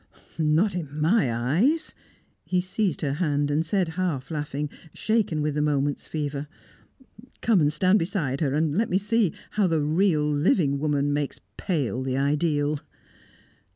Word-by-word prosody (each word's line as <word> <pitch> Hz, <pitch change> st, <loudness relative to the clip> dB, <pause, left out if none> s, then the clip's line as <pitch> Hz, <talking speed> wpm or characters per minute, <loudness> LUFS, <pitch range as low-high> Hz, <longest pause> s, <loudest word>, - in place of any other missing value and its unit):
"Not 160 Hz, +6 st, +2 dB
in 155 Hz, -4 st, -5 dB
my 160 Hz, -, +3 dB
eyes!" 175 Hz, -, +1 dB, 0.5 s
He 180 Hz, -, 0 dB
seized 185 Hz, +1 st, -1 dB
her 140 Hz, -3 st, 0 dB
hand, 145 Hz, -3 st, +1 dB
and 150 Hz, +2 st, +1 dB
said, 180 Hz, +1 st, 0 dB
half 160 Hz, -6 st, -2 dB
laughing, 150 Hz, -1 st, -3 dB, 0.3 s
shaken 210 Hz, -9 st, 0 dB
with 150 Hz, -1 st, 0 dB
the 150 Hz, -, 0 dB
moment's 145 Hz, -1 st, 0 dB
fever, 145 Hz, -2 st, -3 dB, 0.9 s
"Come 215 Hz, -7 st, +3 dB
and 145 Hz, 0 st, +3 dB
stand 185 Hz, +7 st, +3 dB
beside 165 Hz, -7 st, -2 dB
her, 140 Hz, -3 st, +1 dB
and 155 Hz, -1 st, +1 dB
let 225 Hz, +4 st, +1 dB
me 180 Hz, -, +2 dB
see 205 Hz, -2 st, +1 dB, 0.2 s
how 210 Hz, -3 st, +2 dB
the 160 Hz, -3 st, +1 dB
real 155 Hz, 0 st, +2 dB
living 145 Hz, -1 st, +2 dB
woman 145 Hz, -1 st, +1 dB
makes 145 Hz, -1 st, -2 dB, 0.2 s
pale 140 Hz, -, -1 dB
the 130 Hz, 0 st, -2 dB
ideal!" 145 Hz, +1 st, +1 dB
150 Hz, 155 wpm, -25 LUFS, 145-185 Hz, 0.9 s, my